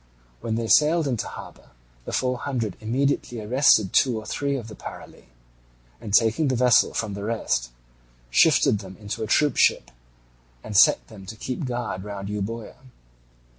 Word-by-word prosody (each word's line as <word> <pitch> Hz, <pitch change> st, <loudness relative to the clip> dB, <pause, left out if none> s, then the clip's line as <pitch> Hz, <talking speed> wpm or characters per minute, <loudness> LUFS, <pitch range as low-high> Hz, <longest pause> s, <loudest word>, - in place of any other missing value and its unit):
When 110 Hz, -1 st, -3 dB
they 115 Hz, 0 st, -2 dB
sailed 150 Hz, +8 st, +3 dB
into 120 Hz, -6 st, -2 dB
harbour -, -, -11 dB, 0.4 s
the -, -, -6 dB
Four 125 Hz, -1 st, -1 dB
Hundred 120 Hz, -9 st, -3 dB
immediately 120 Hz, +1 st, -1 dB
arrested 110 Hz, -3 st, +3 dB
two 125 Hz, -4 st, +3 dB
or 110 Hz, -, -11 dB
three 140 Hz, -1 st, -2 dB
of 120 Hz, -5 st, -6 dB
the 110 Hz, -, -10 dB
Parali -, -, -11 dB, 0.8 s
and, 105 Hz, -, -7 dB
taking 115 Hz, +8 st, +3 dB
the 130 Hz, -, 0 dB
vessel 125 Hz, 0 st, +3 dB
from 105 Hz, -3 st, -2 dB
the 100 Hz, 0 st, -6 dB
rest, 105 Hz, -, -1 dB, 0.6 s
shifted 105 Hz, -, +4 dB
them 95 Hz, -2 st, -11 dB
into 105 Hz, +2 st, -6 dB
a -, -, -4 dB
troopship 145 Hz, -, +2 dB, 0.7 s
and 105 Hz, -, -7 dB
set -, -, +5 dB
them 95 Hz, +7 st, -13 dB
to 110 Hz, -, -7 dB
keep 130 Hz, +7 st, -5 dB
guard 120 Hz, -7 st, -4 dB
round 100 Hz, -1 st, -7 dB
Euboea. 105 Hz, +2 st, -5 dB
115 Hz, 160 wpm, -24 LUFS, 105-125 Hz, 0.8 s, set